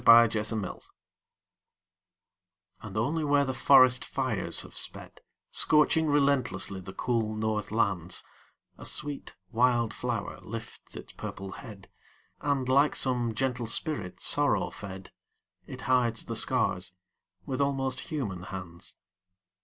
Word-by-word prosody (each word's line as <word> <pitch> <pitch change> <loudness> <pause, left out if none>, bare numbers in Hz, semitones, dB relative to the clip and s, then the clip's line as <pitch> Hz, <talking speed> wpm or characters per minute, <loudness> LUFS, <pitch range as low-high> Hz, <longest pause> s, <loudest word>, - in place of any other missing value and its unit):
FIRE 115 0 +9 0.2
FLOWERS 105 -3 -4 1.9
And 105 -2 -7
only 145 +9 0
where 145 -1 +3
the 130 - -2
forest 130 -1 +6
fires 130 -8 -1
have - - -13
sped, - - -2 0.3
Scorching 155 +1 +4
relentlessly 135 -10 +1
the 95 - -8
cool 110 0 -1
north 110 -1 -1
lands, 95 -5 0 0.6
A - - -9
sweet 145 -1 -3 0.2
wild 120 -1 +2
flower - - -3
lifts - - -8
its - - -9
purple 95 0 -7
head, 105 -6 -10 0.5
And, 140 -3 0
like 140 +3 +4
some 120 -4 0
gentle 125 -2 -1
spirit 115 - -1
sorrow - - +2
fed, 95 -2 -8 0.6
It 130 - -8
hides 120 -3 +1
the - - -4
scars 90 0 +1 0.5
with 130 +1 -2
almost 135 -2 0
human 115 - -3
hands. 90 -2 -8
120 Hz, 120 wpm, -29 LUFS, 100-135 Hz, 1.9 s, FIRE